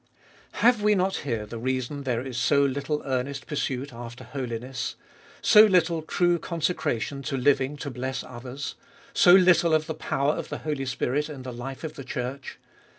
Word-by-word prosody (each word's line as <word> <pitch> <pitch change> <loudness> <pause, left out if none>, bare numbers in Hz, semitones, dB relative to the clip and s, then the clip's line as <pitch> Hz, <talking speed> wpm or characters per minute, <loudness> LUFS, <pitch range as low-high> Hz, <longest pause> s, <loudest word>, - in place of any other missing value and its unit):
1. - - -6
Have 240 -2 +5
we 210 0 +4
not 190 0 +1
here 115 -6 -3
the 115 +2 -7
reason 130 +3 -2
there 125 -1 -1
Is 130 -2 -6
so 140 +4 +3
little 140 +2 -2
earnest 135 +1 -2
pursuit 135 -2 -3
after 120 0 -9
holiness? 125 -2 -4 0.5
so 210 - +8
little 170 -4 +2
true 175 +2 +1
consecration 155 -6 -2
to 140 -1 -3
living 135 +1 +2
to 140 0 -5
bless 130 +1 -4
others? 125 +3 -7 0.4
so 175 - +7
little 175 -3 +5
of 155 0 +1
the 160 - -3
power 140 -1 0
of - - -5
the - - -4
Holy 145 -3 -2
Spirit 135 +4 -1
in 140 -4 -8
the 130 -1 -6
life 130 +4 -7
of 155 -1 -4
the 135 - -8
Church 130 0 -5
140 Hz, 180 wpm, -26 LUFS, 125-155 Hz, 0.5 s, so